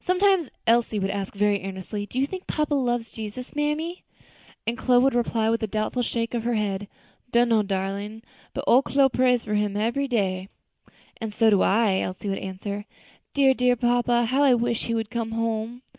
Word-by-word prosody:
Sometimes 365 -4 +2 0.2
Elsie 230 -1 +3
would 195 -1 -1
ask 200 0 -4
very 205 -1 +1
earnestly, 195 +2 -5
"Do 245 - -8
you 265 - +3
thing 370 +6 -5
papa 300 -1 -1
loves 240 -4 0
Jesus, 225 +5 -7
mammy?" 300 +4 -2 0.6
And 230 - -1
Chloe 250 0 +3
would 270 - +3
reply 230 -2 +1
with 230 - 0
a 220 - -1
doubtful 215 +4 -1
shake 230 0 -2
of 235 -2 -1
the 240 0 0
head, 205 -2 -2 0.4
"Dunno, 235 -2 +4
darlin'; 200 +2 -3 0.3
but 275 - -3
ole 255 -1 +6
Chloe 275 0 +3
prays 250 -1 +2
for 210 - -4
him 210 -1 0
ebery 235 +6 0
day." 190 -5 -1 0.7
"And 225 -3 -5
so 220 +1 +3
do 200 - +4
I," 200 -2 +3
Elsie 185 +2 -4
would 195 - -2
answer; 200 +2 -5 0.5
"dear, 270 -2 +5
dear 250 -1 +2
papa, 240 0 +2
how 260 +5 +1
I 270 -3 +6
wish 235 -1 -1
he 230 - -1
would 225 -1 -3
come 230 -2 -3
home!" 230 +2 -2
230 Hz, 190 wpm, -25 LUFS, 210-250 Hz, 0.7 s, ole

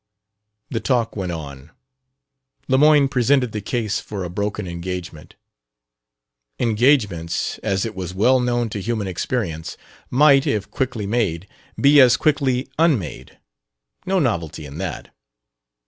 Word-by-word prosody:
The 115 - -1
talk 120 -3 0
went 95 -4 -3
on. 70 -3 -8 1.0
Lemoyne 145 +1 +5
presented 130 -1 +2
the 105 - -4
case 110 0 -2
for 100 -3 -6
a 90 - -5
broken 100 +1 -3
engagement. 85 -2 -7 1.2
Engagements, 110 - +1
as 95 +1 -1
it 110 - -5
was 90 -3 -5
well 120 +8 +3
known 120 -1 0
to 105 -1 -5
human 110 0 -2
experience, 85 -3 -3 0.3
might, 140 +2 +5
if 105 -7 -1
quickly 125 -5 -2
made, 100 -5 -1 0.3
be 140 +1 +6
as 125 -2 +6
quickly 140 -4 +1
unmade: 140 - 0 0.7
no 190 +1 +1
novelty 85 - -1
in 70 +2 -9
that. 95 -5 -6
110 Hz, 125 wpm, -21 LUFS, 90-130 Hz, 1.2 s, be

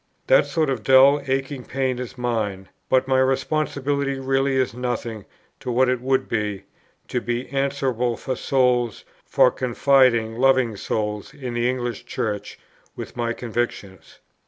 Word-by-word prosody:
That - - +4
sort 155 -4 0
of 125 -5 -2
dull 135 +3 +6
aching 135 0 -2
pain 130 -1 -2
is 125 0 -7
mine; 105 -6 -2 0.2
but 130 0 +3
my 130 -1 +3
responsibility 140 +1 0
really 135 0 0
is 130 -3 +1
nothing 120 -3 -4 0.3
to 125 - -4
what 125 +2 +3
it 125 -1 0
would 130 +1 +1
be, 105 -3 -2 0.5
to 125 - -1
be 120 +2 -3
answerable 130 -3 -1
for 130 - -3
souls, 125 -4 +1 0.2
for 125 - +4
confiding 125 -3 +2
loving 130 -4 +3
souls, 105 +5 -3
in 130 -4 -6
the 120 +1 +1
English 120 -2 -3
Church, 105 -2 -4 0.4
with - - -8
my 120 -1 -1
convictions. 115 -6 -5
125 Hz, 145 wpm, -23 LUFS, 115-135 Hz, 0.5 s, dull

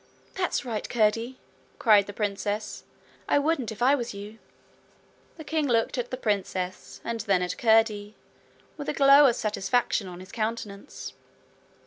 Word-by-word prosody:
'That's 365 -7 -1
right, 225 -4 -4
Curdie!' 230 +3 +1 0.4
cried 210 -4 +5
the - - -5
princess. 205 +1 -3 0.5
'I - - +4
wouldn't 285 -5 0
if 220 +2 -4
I 265 +3 +5
was 240 -6 -2
you.' 205 +2 -9 1.0
The 315 - -8
king 310 -1 -1
looked 230 -3 +1
at 245 -1 -3
the 255 - -4
princess 190 -5 -3
and 230 -1 -3
then 195 -4 +1
at 180 - -3
Curdie 220 -2 +2 0.6
with 290 - -5
a - - 0
glow 280 0 +7
of 240 - +2
satisfaction 215 0 0
on 180 -1 -9
his 185 +1 -12
countenance. 215 0 -5
225 Hz, 150 wpm, -27 LUFS, 205-255 Hz, 1.0 s, glow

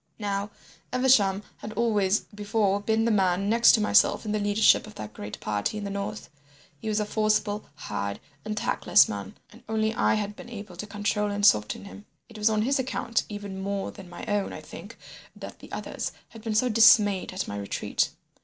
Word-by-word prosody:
Now, 200 -1 -2 0.4
Evesham 220 -6 +3
had 215 - -8
always 210 -4 +2
before 205 -1 -1
been 220 +1 +1
the 230 - +2
man 190 -1 +2
next 230 +1 +6
to 220 - +4
myself 210 - +3
in 210 - -2
the 215 - 0
leadership 205 +1 +3
of 215 - -12
that 105 0 -8
great 105 0 -8
party 105 - -2
in 210 - -5
the 200 - -4
north. 200 +2 -5 0.5
He 220 - -4
was 215 0 +1
a 210 - 0
forcible, 215 -1 0
hard, 100 -1 -4 0.2
and 215 0 -4
tactless - - +4
man, - - -6
and - - -16
only 220 0 0
I - - +2
had 210 -1 -3
been 240 - -11
able 205 -5 -9
to 210 - -6
control 210 0 -1
and 205 0 0
soften 105 - +3
him. 205 +1 -12 0.2
It 215 - -11
was 210 +1 +3
on 215 -1 +1
his 275 +3 +1
account 250 -2 -1
even 205 -2 -6
more 200 0 -3
than 190 -4 -12
my 175 - -8
own, 205 -1 -1
I - - -7
think, - - -11 0.4
that - - -10
the - - -14
others - - -4 0.2
had 225 - -12
been 220 -1 -3
so 250 +4 +3
dismayed 215 -4 +5
at 185 - -4
my 100 - -5
retreat. 100 - -1
210 Hz, 200 wpm, -26 LUFS, 200-220 Hz, 0.5 s, next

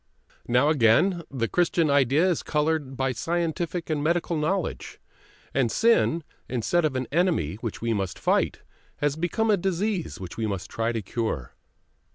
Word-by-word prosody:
Now 125 +5 +3
again 155 - +4
the 120 -4 -1
Christian 170 -1 +2
idea 140 +5 +4
is 175 -4 +1
coloured 150 -3 -1
by 135 0 +1
scientific 170 - -2
and 150 -2 -1
medical 170 +1 +1
knowledge, 165 +4 -2 0.5
and 130 -4 +1
sin, 225 -8 +3 0.3
instead 130 +8 +1
of 145 -4 -1
an 130 0 -1
enemy 160 - +1
which 115 -2 -5
we 115 -1 +1
must 95 -4 -2
fight, - - +1 0.4
has 145 -1 0
become 195 +7 0
a 205 - +4
disease 190 0 -2
which 90 -2 -8
we 110 -1 -1
must 95 -3 -4
try 115 +1 -1
to 115 -3 -3
cure. 95 - -3
150 Hz, 160 wpm, -26 LUFS, 115-175 Hz, 0.5 s, again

